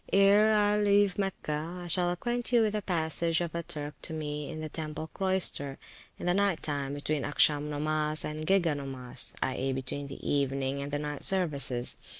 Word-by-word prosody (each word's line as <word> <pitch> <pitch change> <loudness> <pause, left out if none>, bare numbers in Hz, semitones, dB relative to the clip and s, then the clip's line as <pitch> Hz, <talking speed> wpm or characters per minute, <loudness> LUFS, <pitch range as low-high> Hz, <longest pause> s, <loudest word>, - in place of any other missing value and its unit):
Ere 200 +2 +5
I 210 0 +3
leave 205 -1 +3
Mecca, 175 -3 -3
I - - -7
shall 175 +1 +4
acquaint 240 +7 -2
you 235 -2 +5
with 215 -1 0
a 210 - -1
passage 165 -2 0
of 170 -2 -3
a 170 - -2
Turk 150 -2 -4
to 160 - -3
me 150 -1 -4
in 160 -2 -6
the 155 - -4
temple 155 0 -5
cloyster, 180 -6 -1 0.4
in - - -7
the 175 - +2
night 200 -2 +1
time, 140 -2 -2
between 145 0 -2
Acsham 145 0 +2
nomas, 155 0 +2
and 155 +1 -5
Gega 175 -5 +3
nomas, 130 -2 -6
i.e., 130 +1 -1
between 135 +2 -5
the 135 - -8
evening 140 -1 0
and 140 +1 -5
the 145 - 0
night 145 -1 -5
services. 140 -9 +2
155 Hz, 185 wpm, -29 LUFS, 145-185 Hz, 0.4 s, Ere